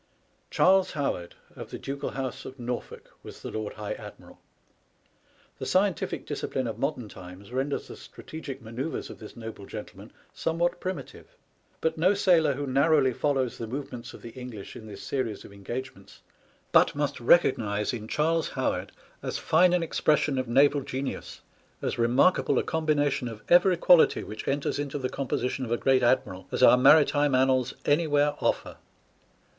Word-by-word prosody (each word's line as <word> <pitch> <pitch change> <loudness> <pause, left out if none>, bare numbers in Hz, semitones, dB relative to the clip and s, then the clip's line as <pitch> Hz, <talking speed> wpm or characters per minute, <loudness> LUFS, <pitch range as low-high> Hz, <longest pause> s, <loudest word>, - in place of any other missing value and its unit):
Charles 190 0 +3
Howard, 115 - -3 0.2
of - - -8
the - - -6
ducal 140 +1 -4
house 135 0 -5
of 130 0 -10
Norfolk, 120 0 -6
was - - -12
the - - -5
Lord 110 -1 -4
High 105 0 -5
Admiral. - - -12 1.2
The - - -4
scientific 190 -2 0
dis - - -4
cipline 130 -2 -2
of 115 - -5
modem 135 -5 -2
times 95 +2 -12
renders 135 +3 -2
the - - -9
strategic 140 -4 -9
manoeuvres 120 +8 -5
of - - -12
this 110 - -11
noble 110 -4 -8
gentleman - - -9 0.2
somewhat 170 +2 -1
primitive, 185 -7 -6 0.5
but 160 0 -1
no 185 +5 +4
sailor 175 -7 +4
who 145 +1 -3
narrowly 140 0 +3
follows 135 -2 -1
the 115 - -4
movements 125 -1 -6
of - - -14
the 115 - -8
English 125 -5 -9
in 110 - -10
this 100 -2 -9
series 115 -7 -3
of - - -13
engagements 100 +1 -8 0.5
but - - +5
must 145 -1 -1
recog 130 +4 +4
nize 105 0 -2
in 110 -2 -5
Charles 160 +5 +1
Howard - - -2 0.3
as - - -3
fine 175 +3 +4
an 180 -1 +2
expression 150 -3 +1
of 130 - -2
naval 140 +4 +4
genius, 135 +1 -5 0.4
as - - -3
remarkable 125 +10 +3
a - - +2
combination 145 -5 0
of 110 -2 -8
every 180 +1 +5
quality 175 0 +5
which 105 +1 -8
enters 140 +1 -1
into 145 0 -3
the 130 -2 -2
composition 130 -1 -2
of 120 - -5
a 120 - +2
great 130 +1 +3
admiral 120 -7 +1
as - - 0
our - - +9
maritime 145 +1 +5
annals 130 -1 +2
anywhere 145 -1 +2
offer. - - -1
135 Hz, 165 wpm, -27 LUFS, 120-150 Hz, 1.2 s, our